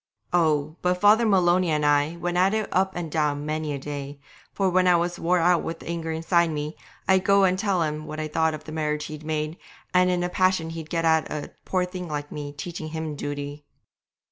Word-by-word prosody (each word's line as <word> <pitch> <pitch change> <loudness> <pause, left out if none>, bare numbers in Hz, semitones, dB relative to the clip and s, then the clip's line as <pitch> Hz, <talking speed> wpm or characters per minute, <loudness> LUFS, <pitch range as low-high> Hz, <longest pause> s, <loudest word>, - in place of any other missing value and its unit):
Oh! 155 -2 +2
but 180 0 +1
Father 215 +3 +5
Maloney 180 -3 +3
and 150 -1 +1
I 145 +2 +3
went 175 0 -2
at 190 +4 +3
it 215 -2 -1
up 190 0 +1
and 170 -3 -4
down 150 -2 0
many 155 0 -2
a 140 - -2
day, 140 0 -6 0.3
for 195 - 0
when 185 0 +3
I 180 - +6
was 175 +1 -1
wore 175 +2 +2
out 175 0 +3
with 165 0 -4
the - - -11
anger 165 -1 -3
inside 165 +1 +2
me, 150 0 -4 0.3
I'd 190 -1 +4
go 200 0 +4
and 185 -1 +4
tell 195 -4 +1
him 155 0 -3
what 155 - -6
I 155 - -2
thought 160 0 +1
of 155 - -10
the 155 - -9
marriage 150 -1 -1
he'd 155 0 -7
made, 155 +1 -2 0.4
and 180 0 +4
in 180 -1 +1
a 175 - -1
passion 185 -3 +1
he'd 165 -1 -7
get 165 -1 -1
at 160 -1 +3
a 150 -1 -5
poor 185 -1 +1
thing 180 -1 -6
like 145 -1 -4
me 145 -1 -5
teaching 160 +2 -6
him 160 -1 -4
duty. 145 0 -5
160 Hz, 225 wpm, -25 LUFS, 150-180 Hz, 0.4 s, I